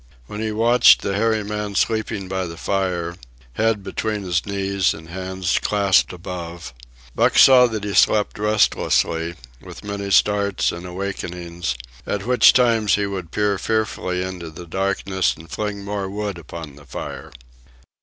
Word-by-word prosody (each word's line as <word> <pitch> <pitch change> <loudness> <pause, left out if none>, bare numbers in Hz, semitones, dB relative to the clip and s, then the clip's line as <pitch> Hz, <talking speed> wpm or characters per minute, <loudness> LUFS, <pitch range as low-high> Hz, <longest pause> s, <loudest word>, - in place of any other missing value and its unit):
When 105 - -7
he 110 -1 -1
watched 115 +3 +5
the 100 - -1
hairy 110 0 +1
man 105 0 -4
sleeping 110 -3 -1
by 95 -1 -2
the 85 0 -8
fire, 90 -2 -2 0.4
head 110 - 0
between 105 0 -3
his 90 -2 -1
knees 100 -1 0
and 80 0 -12
hands 95 +1 -2
clasped 100 -3 +2
above, 85 -3 -7 0.4
Buck - - +2
saw 125 -2 +8
that 110 -3 -4
he 105 -1 -3
slept 105 +2 +3
restlessly, 85 -5 +1 0.3
with - - -11
many 100 -1 -4
starts 100 0 +2
and 85 +1 -7
awakenings, 90 -4 -4 0.3
at 100 -1 -2
which 125 +1 +6
times 115 -4 +3
he 105 - 0
would 95 -4 -5
peer 105 0 0
fearfully 110 -5 -1
into 90 -3 -6
the 85 +3 -10
darkness 95 +1 -1
and 80 +1 -14
fling 105 -1 -4
more 100 -1 -3
wood 100 -2 -4
upon 80 -2 -9
the 70 - -15
fire. - - -7
100 Hz, 155 wpm, -21 LUFS, 90-105 Hz, 0.4 s, saw